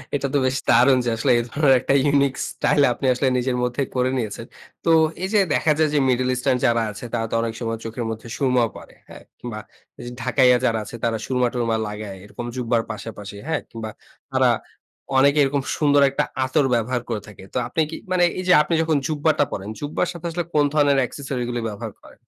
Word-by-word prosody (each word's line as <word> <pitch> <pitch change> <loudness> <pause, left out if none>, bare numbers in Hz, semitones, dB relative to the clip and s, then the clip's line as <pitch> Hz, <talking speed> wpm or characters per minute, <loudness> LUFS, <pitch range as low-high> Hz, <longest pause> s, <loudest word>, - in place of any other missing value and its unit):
এটা 140 0 -1
তো - - +3
বেশ 130 +1 +1
দারুণ 125 +3 +6
যে - - +1
আসলে 125 +3 +1
এই - - -1
ধরনের 140 -3 +4
একটা 135 - +1 0.2
unique 140 -1 +2
স্টাইল 145 - +1
আপনি 135 - -6
আসলে 130 +2 0
নিজের 125 0 0
মধ্যে 125 +3 -1
করে 125 0 +2
নিয়েছেন। 110 -4 -4 0.4
তো - - 0 0.3
এইযে 205 +2 +2
দেখা 155 - +2
যায় 155 -1 +3
যে - - +2
middle 125 0 +1
eastern 125 +1 +1
যারা 115 -1 +3
আছে 105 +4 -9
তারা 115 -1 0
তো - - 0
অনেক 115 -1 -2
সময় 115 0 -2
চোখের 115 +1 -4
মধ্যে 115 +1 -6
সুরমাও 125 -4 +2
পরে। - - -13 0.2
হ্যাঁ? - - -12 0.2
কিংবা 115 -3 -6 0.4
ঐযে 120 - -8
ঢাকাইয়া 125 -1 +4
যারা 115 -2 +1
আছে 120 - -9
তারা 115 -1 +1
সুরমা-টুরমা 120 -3 0
লাগায় 105 -2 -6
এরকম 110 +4 -8
জুব্বা 120 -2 0
র - - -11
পাশাপাশি, 105 -2 -8
হ্যাঁ? 160 -2 -1
কিংবা 115 -2 -6 0.4
তারা - - +3 0.7
অনেকে 140 +2 +4
এরকম 140 0 0 0.2
সুন্দর 145 -2 +4
একটা 140 - 0 0.2
আতর 135 +2 +2
ব্যবহার 120 +2 -1
করে 110 -3 -2
থাকে। 100 -2 -13
তো - - -2
আপনি 160 +6 -1
কি 165 - -6 0.2
মানে 180 -1 +3 0.2
এইযে 180 -1 +3
আপনি 150 +3 -2
যখন 160 -2 +1
জুব্বা 155 0 +1
টা - - +6
পড়েন, 100 +1 -5
জুব্বা 145 +1 -3
র - - 0
সাথে 175 -1 -10
আসলে 175 +1 -2
কোন 145 -1 +4
ধরনের 145 -2 +3
accessory 135 -2 -5
গুলো 120 0 -2
ব্যবহার 105 -1 -7
করেন? - - -17
125 Hz, 210 wpm, -22 LUFS, 115-145 Hz, 0.7 s, দারুণ